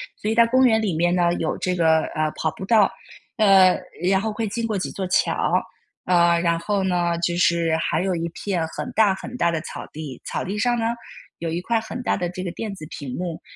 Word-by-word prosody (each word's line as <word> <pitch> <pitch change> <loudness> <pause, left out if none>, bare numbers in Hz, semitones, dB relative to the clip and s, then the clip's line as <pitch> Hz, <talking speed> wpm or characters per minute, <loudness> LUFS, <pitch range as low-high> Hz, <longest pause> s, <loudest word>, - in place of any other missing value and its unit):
所 215 - -3
以 - - +2
在 230 +1 +5
公 260 +2 +4
园 220 -2 +4
里 195 -6 -1
面 175 +2 +2
呢 175 -1 +2
有 165 -2 -2
这 180 0 -1
个， 160 -2 +3
呃， 155 0 0
跑 160 - +1
步 - - -8
道， 215 -1 +4 0.5
呃， 195 -5 +6 0.3
然 195 0 +3
后 220 0 -2
会 220 +1 -3
经 230 +3 -3
过 215 -3 -1
几 185 - -3
座 190 - -4
桥。 185 - +1 0.5
啊， 170 -1 +4
然 170 -1 +1
后 195 +3 -1
呢， 175 -2 +1
就 170 0 0
是 170 -2 +2
还 160 +1 0
有 190 -2 0
一 170 0 -2
片 180 -4 -2
很 - - -5
大 210 -3 +4
很 240 +6 -8
大 170 -9 +1
的 165 - -1
草 155 - -8
地， 150 -4 -8
草 - - -3
地 200 +3 -4
上 240 +3 +1
呢， 225 - -1 0.5
有 165 - -3
一 170 +2 -2
块 225 +4 0
很 235 +3 -6
大 - - 0
的 175 - -2
这 185 +1 -6
个 175 - -2
电 215 +2 -5
子 170 -5 -9
屏 140 -7 -7
幕。 175 -2 -4
180 Hz, 250 characters per minute, -23 LUFS, 170-210 Hz, 0.5 s, 呃